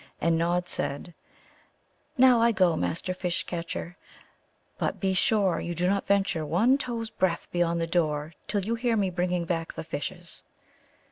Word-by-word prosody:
And 165 0 +2
Nod 175 +2 +1
said: 170 +1 -4 1.0
"Now 250 -2 +6
I 235 0 +5
go, 185 -5 +3
Master 180 +3 -1
Fish 180 -1 -2
catcher; 170 +1 -5 0.8
but - - -1
be 190 -1 +1
sure 195 -1 +2
you 175 0 -4
do 175 +2 0
not 195 +2 +1
venture 195 -5 +1
one 225 - +3
toe's 230 -4 -4
breadth 185 -5 -1
beyond 170 -1 +1
the 165 - 0
door 155 -2 0
till 200 -3 -1
you 225 - 0
hear 230 -1 +1
me 195 -3 +1
bringing 180 -1 -1
back 165 -1 -2
the - - -6
fishes." 150 -3 -6
180 Hz, 160 wpm, -27 LUFS, 170-200 Hz, 1.0 s, Now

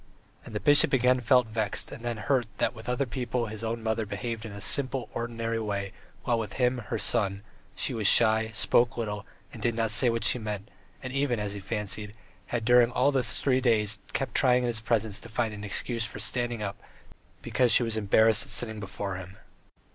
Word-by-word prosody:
And - - -10
the - - 0
bishop 145 +3 +4
again 125 0 +4
felt 125 0 +3
vexed 110 -2 -2
and - - -9
then 120 -1 -3
hurt 120 +2 0
that - - 0
with 110 0 -9
other 125 +3 0
people 120 0 -2
his 110 0 -7
old 115 +1 -2
mother 110 0 -1
behaved 115 +2 -4
in - - -9
a 100 - -8
simple, 130 +4 +1
ordinary 115 -1 -3
way, 100 -3 -3 0.3
while 120 -1 +1
with 105 -4 -5
him, 125 -1 +1
her - - -2
son, 100 -4 +1 0.3
she - - -1
was 110 -3 +1
shy, 110 0 +4
spoke 120 +2 +2
little, 105 -3 -4 0.3
and - - -10
did 120 -1 0
not 115 -1 +1
say 125 - +6
what 115 0 -1
she 125 - +3
meant, 105 0 -6 0.3
and 130 -1 -5
even, 135 -4 0
as 105 -1 -3
he 100 - -6
fancied, 105 +1 -3 0.3
had 120 -2 -3
during 120 0 +5
all 130 +3 +2
those 125 -5 -1
three 130 -2 +2
days 110 -4 +2
kept 135 -3 -3
trying 125 -2 +3
in - - 0
his 115 -2 -1
presence 110 -2 -1
to 115 - -10
find 115 -1 -1
an 105 0 -8
excuse 115 +3 -3
for 110 - -6
standing 120 +1 -1
up, 100 -1 -5 0.6
because 125 -2 +2
she - - +6
was 115 -1 -1
embarrassed 110 +1 +4
at - - -6
sitting 110 -3 -2
before 95 -1 -5
him. 95 +1 -10
115 Hz, 210 wpm, -28 LUFS, 105-125 Hz, 0.6 s, say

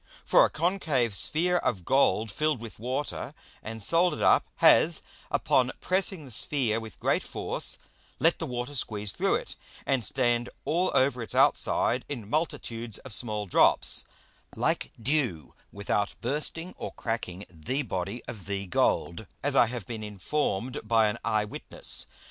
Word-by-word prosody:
For - - +6
a - - +3
concave 155 - 0
Sphere 170 - +3
of 100 - -1
Gold 110 -5 +3
filled 155 +3 0
with 115 -2 -9
Water, 130 +4 -3 0.3
and 110 0 -7
solder'd 170 - +2
up, - - +4
has, - - +5 0.3
upon 130 0 +2
pressing 185 -3 +1
the 130 - -12
Sphere 115 -1 0
with 110 -5 -10
great - - +1
force, - - -1 0.4
let 165 +1 +2
the 165 - -2
Water 125 +2 -4
squeeze 105 -6 -2
through - - +1
it, - - -4 0.3
and 135 -3 +1
stand 120 +1 +1 0.2
all 180 +3 +1
over 130 -2 +3
its 115 - -4
outside 125 0 +3
in 120 -8 -5
multitudes 120 - -2
of 130 - -7
small 105 -3 0
Drops, 90 - +4 0.5
like - - -1
Dew, 120 - -1 0.2
without 100 0 -1
bursting 155 +7 -3
or - - -4
cracking 105 -5 -4
the 90 - -3
Body 100 +1 -4
of 105 -6 -9
the 100 0 -3
Gold, 90 +1 0 0.2
as 145 -1 0
I 120 - +6
have 120 -4 -5
been 110 0 -6
inform'd 110 +4 -2
by 110 -1 +3
an 105 - -4
Eye 105 -1 +1
witness. 105 - -4
120 Hz, 155 wpm, -28 LUFS, 105-145 Hz, 0.5 s, For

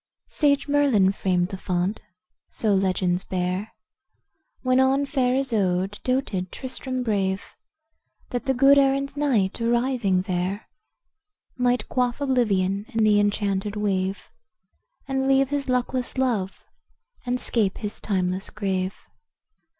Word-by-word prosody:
Sage 285 -2 +1
Merlin 275 -10 +3
framed 180 -2 0
the 190 -2 -6
font, 180 +3 -1 0.5
so 215 -3 0
legends 185 -1 +1
bear, 185 +3 -2 0.9
When 255 0 +3
on 270 +2 +3
fair 260 -3 +1
Isoude 205 -7 0
doated 220 -9 -1
Tristram 260 -1 -4
brave, 195 -4 -1 0.8
That 245 +2 -3
the 265 - +2
good 275 +2 +6
errant 275 0 +1
knight, 240 -9 +1
arriving 235 -5 +1
there, 185 +2 -2 0.9
Might 250 -1 +1
quaff 250 -1 0
oblivion 205 -8 +1
in 225 -4 0
the 210 -1 +5
enchanted 205 0 0
wave, 195 -2 -2 0.8
And 265 0 0
leave 270 0 +3
his 280 -2 -2
luckless 250 0 -1
love, 225 -8 -1 0.6
and 250 0 -1
'scape 215 -6 0
his 210 -1 -5
timeless 185 -1 -1
grave. 190 -2 -2
215 Hz, 120 wpm, -24 LUFS, 190-260 Hz, 0.9 s, good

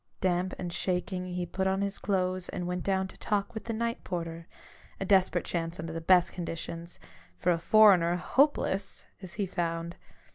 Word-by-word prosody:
Damp 185 0 0
and 175 -1 -4
shaking, 180 0 -1
he 180 0 -3
put 190 +2 -1
on 190 +1 +1
his 200 0 -1
clothes 185 -2 -1
and 180 - -4
went 180 0 -2
down 190 -1 +1
to - - -14
talk 205 +2 -1
with 220 - -6
the 230 - -3
night 230 +1 -2
porter 165 -1 -5 0.3
— - - -25
a 195 - -2
desperate 185 -3 +3
chance 165 0 -3
under 160 0 -5
the 165 - -4
best 180 +1 +4
conditions; 170 0 -6 0.4
for 180 - +2
a 170 - +1
foreigner, 180 -3 +6
hopeless! 205 0 +1 0.2
as 185 -1 -8
he 205 - -1
found. 170 -2 -3
180 Hz, 185 wpm, -29 LUFS, 170-195 Hz, 0.4 s, foreigner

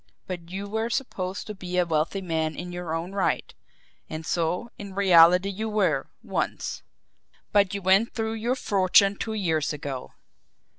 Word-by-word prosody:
But 175 -2 -6
you 195 +3 -5
were 220 +2 -1
supposed 200 -7 -3
to 215 - -6
be 180 -2 -5
a 180 - +4
wealthy 165 +4 0
man 160 -3 -1
in 175 +3 -6
your 175 -2 -3
own 170 +3 -4
right; 195 -1 -1 0.6
and 160 0 -6
so, 175 +7 -1
in 200 -2 -8
reality 180 -1 +6
you 220 +3 -3
were 210 -3 +1 0.2
once. - - -3 0.7
But 200 -2 +3
you 200 - -4
went 195 +5 +3
through 225 -1 -1
your 230 +3 -1
fortune 195 -3 +4
two 220 +2 -4
years 160 -8 0
ago. 140 -3 -6
185 Hz, 160 wpm, -26 LUFS, 170-205 Hz, 0.7 s, reality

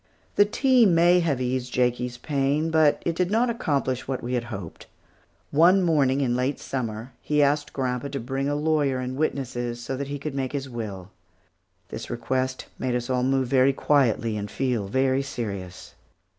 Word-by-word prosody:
The 205 - +6
tea 250 +2 +4
may 175 0 +5
have 155 -7 0
eased 125 0 -2
Jakie's 125 0 0
pain, 145 +4 0
but 155 -2 +3
it 170 - 0
did 180 +1 0
not 235 +4 +2
accomplish 140 - -1
what 130 -1 -3
we 125 +1 -3
had 120 -1 -1
hoped. 95 -8 -8 0.6
One 180 +6 +5
morning 145 -6 +2 0.2
late 130 +3 0
in - - -21
Summer, 120 -1 -5
he 150 -1 +2
asked 145 +1 +1
grandpa 125 0 -2
to 140 0 -4
bring 135 +3 -2
a 145 - 0
lawyer 150 -3 +1
and 130 0 -4
witnesses 125 -5 -2
so 120 +3 -4
that 140 0 -4
he 145 +1 -4
could 145 +1 -5
make 135 -1 -3
his 135 -1 -3
will. 105 -6 -6 0.8
This - - -7
request 130 0 -2
made 125 -1 -1
us 125 +1 -2
all 125 -1 +1
move 135 +1 +2
about - - -12
very 135 0 +4
quietly 125 -6 +1
and 105 0 -4
feel 125 -7 -1
very 130 +4 +1
serious. 100 -9 -6
135 Hz, 185 wpm, -25 LUFS, 125-145 Hz, 0.8 s, The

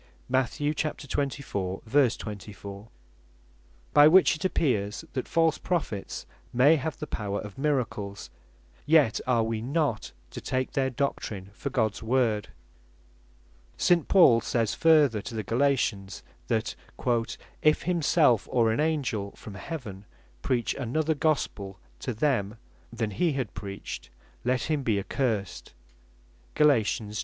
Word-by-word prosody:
(Mat. 130 -1 0
24. 140 -9 -2
24) 105 -5 -2 1.1
By 145 +1 +8
which 180 +1 +6
it 155 - -8
appears, 110 - 0
that 130 - -3
false 165 -2 +2
Prophets 150 - -3 0.3
may 135 +6 +5
have 155 +2 -4
the - - -5
power 100 -7 -3
of 105 +3 -9
miracles; 125 -9 -2 0.6
yet 150 -8 +4
are 120 -3 +3
wee 110 -1 -2
not 140 -2 -1 0.2
to - - -7
take 130 0 -2
their 135 -2 +1
doctrin 110 -7 -3
for 140 +5 -5
Gods 110 -6 0
Word. 115 -3 +1 1.3
St. 175 -3 +3
Paul 135 -12 +6
says 115 -1 0
further 150 -9 +4
to 115 - -7
the 110 - -2
Galatians, 115 -6 0 0.2
that 115 -2 -1 0.9
"if 155 0 +3
himself, 160 - +3
or 115 -3 +3
an 110 - -1
Angell 135 -10 -1
from 105 - -10
heaven 105 - -7 0.4
preach 120 - 0
another 155 +5 0
Gospel 135 -10 -1 0.2
to - - -3
them, 110 -5 0 0.3
than 115 -2 -2
he 155 - +1
had 130 -9 -3
preached, 100 0 -7 0.3
let 125 -1 +1
him 155 -3 0
be 115 -6 +1
accursed." 105 -1 -2 0.8
(Gal. 150 0 +6
1. 125 -6 +4
125 Hz, 125 wpm, -27 LUFS, 105-145 Hz, 1.3 s, By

